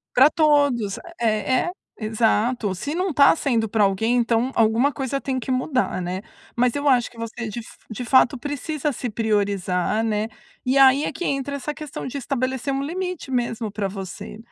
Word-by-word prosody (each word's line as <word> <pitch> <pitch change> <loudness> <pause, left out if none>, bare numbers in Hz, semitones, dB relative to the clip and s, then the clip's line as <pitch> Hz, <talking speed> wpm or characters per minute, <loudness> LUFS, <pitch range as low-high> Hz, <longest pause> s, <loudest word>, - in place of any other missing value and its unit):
Para 265 +4 +7
todos. 285 - +2 0.2
É 225 - +1
é, - - -4 0.3
exato. 220 0 +1
Se 285 +11 -4
não 365 +1 0
está 280 -1 +6
sendo 235 -8 0
para 215 0 +2
alguém, 220 +5 +1
então 235 +1 +1
alguma 230 +5 +3
coisa 275 0 -3
tem 260 -1 -2
que 255 - -7
mudar, 255 -5 0
né. 180 +2 -3 0.3
Mas 245 0 +2
eu 285 0 -1
acho 245 -3 +3
que 240 - -18
você 230 0 -5
de 215 +2 -5
f 225 - -12
de 225 +3 -5
fato 260 +2 +4
precisa 290 +2 -3
se 250 -1 -4
priorizar, 205 -2 0
né. 215 -1 0 0.4
E 255 +2 +2
aí 270 +2 +6
é - - -2
que 355 - -5
entra 280 0 -1
essa 290 +2 -4
questão 300 -1 -7
de 260 - -5
estabelecer 265 0 -2
um 270 - -1
limite 360 -1 -4
mesmo 235 -3 -1
para 205 -1 -2
você. 195 +1 -7
245 Hz, 185 wpm, -23 LUFS, 220-275 Hz, 0.4 s, Para